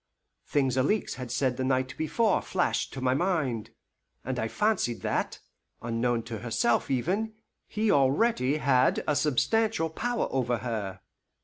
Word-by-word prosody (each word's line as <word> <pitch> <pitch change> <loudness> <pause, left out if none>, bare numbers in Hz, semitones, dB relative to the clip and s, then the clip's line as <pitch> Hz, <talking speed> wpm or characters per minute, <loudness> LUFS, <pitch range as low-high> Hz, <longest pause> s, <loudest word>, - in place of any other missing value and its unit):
Things 135 -3 +1
Alixe 205 +12 +1
had 125 -2 -6
said 130 -1 0
the 130 - -1
night 130 0 0
before 190 +7 +1
flashed 180 -2 -1
to 135 - -6
my 130 0 +2
mind, 135 - 0 0.6
and 130 0 -2
I 110 - 0
fancied 210 - 0
that, - - -1 0.4
unknown 115 0 -1
to 115 -1 -6
herself 120 +1 +1
even, 195 - -1 0.3
he 215 0 0
already 140 - +3
had 130 -3 +3
a 150 - +2
substantial 160 - +1
power 240 +7 -1
over 125 -2 0
her. 105 -5 -4
130 Hz, 140 wpm, -28 LUFS, 120-175 Hz, 0.6 s, already